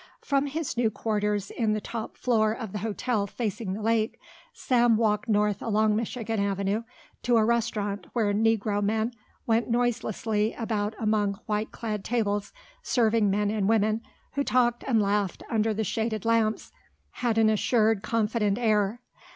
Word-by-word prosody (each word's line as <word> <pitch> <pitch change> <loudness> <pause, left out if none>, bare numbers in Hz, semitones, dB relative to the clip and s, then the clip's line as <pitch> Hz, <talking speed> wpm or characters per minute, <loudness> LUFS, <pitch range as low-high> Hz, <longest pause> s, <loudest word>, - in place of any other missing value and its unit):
From 280 0 +1
his 295 -3 -3
new 235 -2 +3
quarters 210 -2 -1
in 220 -3 0
the 215 - 0
top 225 +1 -6
floor 220 -3 +2
of 225 -4 -6
the 210 - -4
hotel 215 0 -1
facing 215 -2 -3
the 210 +2 -5
lake, 225 0 +1 0.3
Sam 240 -3 +2
walked 215 0 +1
north 210 -1 +2
along 215 -1 +2
Michigan 225 0 -2
Avenue 200 +1 0 0.4
to 240 -1 +3
a 220 - +4
restaurant 215 -3 -1
where 215 -4 +1
Negro 215 -1 +1
men 220 +3 0 0.3
went 230 +1 +1
noiselessly 225 -2 0
about 220 -2 -2
among 210 -2 +1
white 210 0 -2
clad 210 -3 -4
tables, 205 -4 -1 0.3
serving 225 - +2
men 205 +1 +1
and 210 -2 0
women 220 0 +2 0.3
who 280 - 0
talked 240 -3 +2
and 235 -4 +3
laughed 200 -2 0
under 220 -1 +2
the 220 +1 -1
shaded 220 0 -2
lamps 225 -1 +1 0.4
had 235 -3 -1
an 225 -1 +5
assured, 220 -1 +2
confident 215 -2 0
air. 215 -1 +1
220 Hz, 155 wpm, -27 LUFS, 210-230 Hz, 0.4 s, an